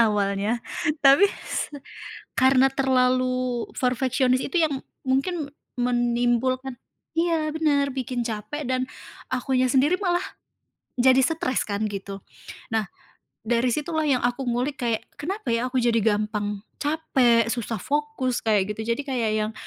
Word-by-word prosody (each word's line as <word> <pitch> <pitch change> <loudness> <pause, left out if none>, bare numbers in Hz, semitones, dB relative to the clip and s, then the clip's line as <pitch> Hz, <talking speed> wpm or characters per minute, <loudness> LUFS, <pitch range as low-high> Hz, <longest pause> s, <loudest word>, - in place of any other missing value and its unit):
awalnya. 205 +2 0 0.4
Tapi 275 +8 +7 0.2
s - - -2 0.7
karena 265 0 +5
terlalu 255 -2 +1
perfeksionis 255 0 +1
itu 360 - -3
yang 300 - 0 0.3
mungkin 280 +3 -1 0.2
menimbulkan 245 +1 +1 0.4
iya 325 -2 +1
benar, 290 -3 +1
bikin 250 -2 -3
capek 235 +7 -4
dan 255 0 -1 0.4
akunya 255 0 +1
sendiri 285 +9 +3
malah 355 -2 +1 0.7
jadi 260 +1 +5
stress 265 -2 0
kan 205 +1 -1
gitu. 195 0 -6 0.5
Nah, 220 -3 0 0.5
dari 235 +2 +1
situlah 315 +2 -1
yang 270 -4 +2
aku 245 +3 -1
ngulik 250 +4 -1
kayak, 225 -2 0 0.2
kenapa 370 - -4
ya 230 +2 +1
aku 255 0 0
jadi 235 -1 +2
gampang 210 -1 0 0.2
capek, 260 -7 +2
susah 230 -3 -3
fokus 290 -3 -1
kayak 210 -2 +2
gitu. 220 +1 0
Jadi 235 - -4
kayak 250 -6 -1
yang 215 0 0
255 Hz, 130 wpm, -24 LUFS, 230-275 Hz, 0.7 s, Tapi